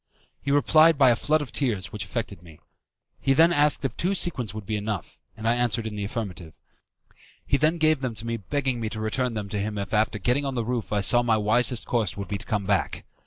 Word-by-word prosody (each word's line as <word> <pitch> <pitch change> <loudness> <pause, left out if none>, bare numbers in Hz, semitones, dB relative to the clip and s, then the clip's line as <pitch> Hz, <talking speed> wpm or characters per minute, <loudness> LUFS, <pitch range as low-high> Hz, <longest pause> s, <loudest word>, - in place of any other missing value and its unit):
He 140 - -4
replied 155 +3 +5
by 135 -3 +6
a - - +3
flood 155 +6 +1
of 130 - -10
tears, 110 -9 -1
which 105 -2 -5
affected 100 -1 -5
me. 80 -3 -16 0.6
He 135 - +2
then 165 +4 +5
asked 145 -2 +3
if 135 - -3
two 190 +3 -1
sequins 135 - 0
would 105 -1 -8
be 110 - -2
enough, 105 -4 -5 0.2
and 110 +1 -4
I 115 - +4
answered 120 -1 0
in 110 -1 -5
the 100 -1 -3
affirmative. 95 -7 -6 0.9
He - - +1
then 155 +4 +2
gave 155 -2 +3
them 125 -4 -3
to 115 - -4
me 115 0 -2
begging 130 +3 -2
me 110 -1 -3
to 110 - -6
return 115 +3 -1
them 105 -2 -4
to 105 - -3
him 105 +1 -3
if 100 0 -5
after 110 0 +1
getting 125 +7 +1
on 135 -2 -3
the 120 -2 -1
roof 120 -2 -3
I 105 -1 +1
saw 120 +4 +5
my 115 -2 +2
wisest 120 +3 +1
course 110 -6 -1
would 100 - -6
be 100 -1 -3
to 115 - -12
come 105 -2 -1
back. 100 -2 -1
115 Hz, 245 wpm, -25 LUFS, 105-135 Hz, 0.9 s, by